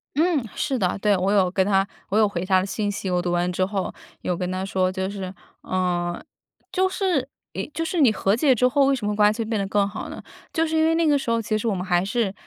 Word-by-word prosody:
嗯， 315 -3 +2
是 275 -4 -1
的。 180 -4 0
对， 205 0 +3
我 190 +2 +1
有 195 -3 +3
跟 190 0 +2
她， 195 0 +2 0.2
我 205 - +1
有 215 -1 +5
回 180 -3 -3
她 190 0 +4
的 185 - -1
信 205 +2 -2
息。 195 -1 -4
我 180 -1 +1
读 175 0 -2
完 175 +1 +1
之 185 +1 +1
后， 195 -1 -3 0.3
有 180 - -1
跟 180 +1 -3
她 185 +1 -2
说， 185 -1 0
就 190 0 -2
是， 190 -2 -6 0.3
呃， 175 -2 -1 0.5
就 375 0 +2
是， 365 -9 0 0.3
一 - - -4
就 330 - -2
是 345 +1 -1
你 255 -6 +6
和 200 -1 +1
解 260 +2 +3
之 250 +2 +3
后 275 +2 +3
为 275 - +3
什 240 -5 -5
么 210 0 0
关 210 0 +5
系 225 0 -3
变 220 -1 -1
得 195 - -1
更 200 0 +2
好 205 - -6
呢？ - - -8 0.3
就 325 - +2
是 320 0 -2
因 315 - +3
为 325 +1 +3
那 335 0 +2
个 295 -2 +4
时 255 - -4
候， 230 0 +2
其 215 0 -1
实 215 - -3
我 210 - +1
们 180 0 -4
还 175 -3 +2
是 205 0 -1
205 Hz, 295 characters per minute, -23 LUFS, 185-250 Hz, 0.5 s, 你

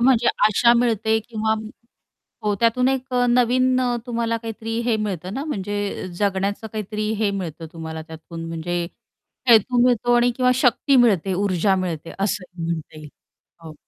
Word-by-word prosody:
म्हणजे 240 -1 +4 0.2
आशा 235 +3 +4
मिळते 220 -2 +2
किंवा 220 -1 0 0.9
हो, 210 -1 +1
त्यातून 235 +2 +3
एक 265 0 -2
अ, 245 0 +3
नवीन 255 +1 +3
अ, 245 -1 +1
तुम्हाला 230 -1 -1
काहीतरी 225 0 -5
हे 235 -2 +2
मिळतं 195 -3 -4
ना 275 +4 -3
म्हणजे 205 -8 -3
जगण्याचं 200 +1 -1
काहीतरी 215 0 -4
हे 215 -2 +1
मिळतं 170 -5 -5
तुम्हाला 160 -1 -6
त्यातून 160 +1 -9
म्हणजे 170 +1 -3 0.7
हेतू 240 +2 +5
मिळतो 245 -1 +3
आणि 240 +1 +4
किंवा 250 -1 +3
शक्ती 260 +2 +3
मिळते, 200 -7 +3
ऊर्जा 195 0 +1
मिळते, 170 -4 -4
असं 195 -1 -1 0.2
म्हणता 165 -2 -4
येईल. 150 -1 -10 0.5
हो. 160 -1 -9
215 Hz, 150 wpm, -22 LUFS, 185-240 Hz, 0.9 s, हेतू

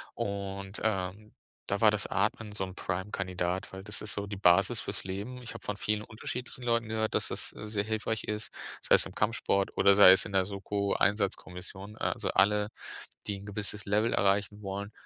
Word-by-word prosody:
Und, 100 0 -4
ähm, 105 0 -2 0.3
da 100 0 -1
war 110 - +8
das 105 -1 -1
Atmen 105 +2 -1
so 105 - -3
'n 95 0 -10
Prime-Kandidat, 90 -1 -3
weil 95 0 -7
das 105 0 -4
ist 105 - -3
so 100 0 -3
die 100 - -5
Basis 95 +4 +4
fürs 100 -1 -3
Leben. 100 +7 -5
Ich 120 - -6
habe - - -5
von 105 - -3
vielen 105 0 0
unterschiedlichen 125 +4 -6
Leuten 115 -2 +1
gehört, 110 0 0
dass - - +1
das, - - -2
äh, - - -8
sehr 105 -1 -1
hilfreich 110 +1 -2
ist. 105 0 -3 0.3
Sei - - +2
es - - +3
im - - -13
Kampfsport 105 -2 +1
oder 100 0 +6
sei 100 -2 +10
es 95 +1 +5
in 100 - -7
der 95 -1 +4
Soko-Einsatzkommission. 100 -1 -1
Äh, - - -15
also, - - -1
alle, 105 +2 +3 0.6
die 100 -1 -2
'n 100 - -11
gewisses 105 0 -3
Level 105 +3 +2
erreichen 100 +1 +1
wollen, 100 +1 -5
100 Hz, 195 wpm, -30 LUFS, 95-105 Hz, 0.6 s, sei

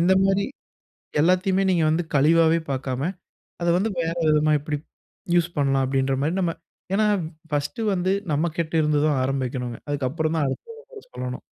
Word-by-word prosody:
இந்த 180 +3 +4
மாதிரி 195 +1 +2 0.8
எல்லாத்தையுமே 185 +3 +3
நீங்க 170 -3 +2
வந்து 160 +3 +1
கழிவாவே 160 +3 +4
பார்க்காம, 130 -1 -2 0.6
அத 170 - 0
வந்து 215 +4 0
வேற 165 0 -1
விதமா 155 0 +3
எப்படி 150 0 -3 0.6
யூஸ் 175 0 +2
பண்ணலாம்? 135 -1 +2
அப்படின்ற 135 0 +1
மாரி, 155 +4 0
நம்ம 170 -3 0 0.4
ஏன்னா 215 +1 +3 0.4
ஃபர்ஸ்ட்டு 150 - -1
வந்து 185 0 0 0.2
நம்மகிட்ட 160 +2 -1
இருந்துதா 150 0 +2
ஆரம்பிக்கணுங்க. 130 -3 -2
அதுக்கப்புறம் 145 +3 -1
தான் 150 - +1
அடுத்தவங்கட்ட 455 - -9
சொல்லணும். 125 0 -5
155 Hz, 140 wpm, -24 LUFS, 140-180 Hz, 0.8 s, இந்த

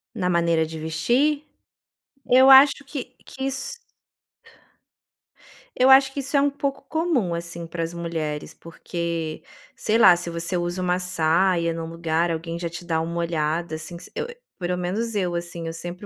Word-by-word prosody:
Na 180 -5 -1
maneira 170 -2 +2
de 160 0 -7
vestir? 240 - +1 0.8
Eu 260 +2 +6
acho 275 +1 +8
que 270 -2 -6
que 265 - -8
isso 275 - -3 2.0
eu 255 +1 +5
acho 265 0 +7
que 280 - -3
isso 275 +2 -1
é - - +5
um 285 - +3
pouco 280 -1 -3
comum, 315 - 0
assim, 170 0 -6
para 165 0 -4
as 165 +1 -4
mulheres, 165 -3 -4
porque, 165 -1 -5 0.3
sei 220 +1 +1
lá, 190 -6 +8
se 175 0 -5
você 170 +2 -3
usa 175 +1 -2
uma 180 0 +1
saia 170 0 +1
num 165 0 -5
lugar 165 0 -1
alguém 165 +1 -4
já 170 0 -3
te 175 +1 -9
dá 160 -2 0
uma 170 +1 -4
olhada, 165 0 -1
assim, 160 +2 -7
se - - -11
eu, - - -2
eh 475 0 -10 0.2
pelo 180 -1 -2
menos 210 +6 -2
eu, 180 -4 0
assim, 170 -1 -5
eu 165 - -4
sempre 175 +4 -7
175 Hz, 175 wpm, -24 LUFS, 165-235 Hz, 2.0 s, acho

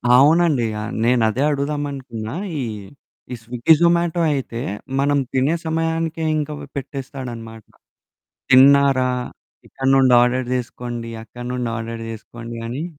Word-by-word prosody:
అవునండి. 150 -1 +4 0.2
ఆహ్, 110 +3 -5
నేను 120 0 +3
అదే 120 +5 -2
అడుగుదామనుకున్నా. 140 -6 -3 0.3
ఈ, - - -1 0.7
ఈ - - -3
స్విగ్గీ, 120 +6 +3
జొమాటో 170 0 +2
అయితే 125 -4 -4 0.4
మనం 145 +1 +2 0.2
తినే 135 +5 +2
సమయానికే 165 0 -1
ఇంక 150 0 -2 0.3
పెట్టేస్తాడనమాట. 125 -5 -7 0.9
"తిన్నారా? 135 0 +6 0.6
ఇక్కడి 135 0 -2
నుండి 130 -2 +5
ఆర్డర్ 125 +1 +1
జేసుకోండి. 120 -1 -4
అక్కడి 120 +2 -9
నుండి 125 -2 -2
ఆర్డర్ 115 0 -5
జేసుకోండి" 115 +1 -8
అని. 130 +6 -4
130 Hz, 115 wpm, -21 LUFS, 120-145 Hz, 0.9 s, తిన్నారా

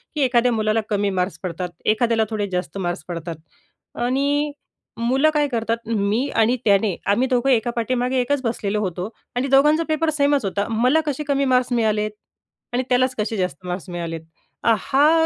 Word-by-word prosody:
की 300 - 0
एखाद्या 250 -2 +3
मुलाला 215 -1 +1
कमी 205 -1 +1
मार्क्स 180 -2 -1
पडतात, 180 0 -3 0.2
एखाद्याला 225 +1 +2
थोडे 210 -2 -2
जास्त 180 -1 -3
मार्क्स 175 -6 -3
पडतात 170 -1 -5 0.7
आणि 285 +3 +1 0.5
मुलं 265 +6 +3
काय 295 -1 +2
करतात, 230 -3 -1
"मी 220 +4 +1
आणि 230 +3 +3
त्याने, 200 -2 +3
आम्ही 235 +6 +2
दोघं 255 0 +1
एका 240 -2 +2
पाठीमागे 250 +2 0
एकच 285 +2 0
बसलेलो 215 -3 -1
होतो 185 -1 -3 0.3
आणि 250 +2 0
दोघांचा 295 +4 +4
पेपर 315 +1 +1
सेमच 285 -4 +2
होता, 200 +1 -1
मला 250 +7 +3
कसे 295 0 -2
कमी 280 -1 +1
मार्क्स 250 0 +2
मिळालेत 215 -2 +1 0.6
आणि 250 +1 +1
त्यालाच 255 +1 +2
कसे 215 +1 -1
जास्त 180 -2 -3
मार्क्स 180 +1 -5
मिळालेत?" 170 -2 -4 0.4
आ, 230 - +5
हा 300 +9 +3
230 Hz, 170 wpm, -22 LUFS, 200-265 Hz, 0.7 s, आ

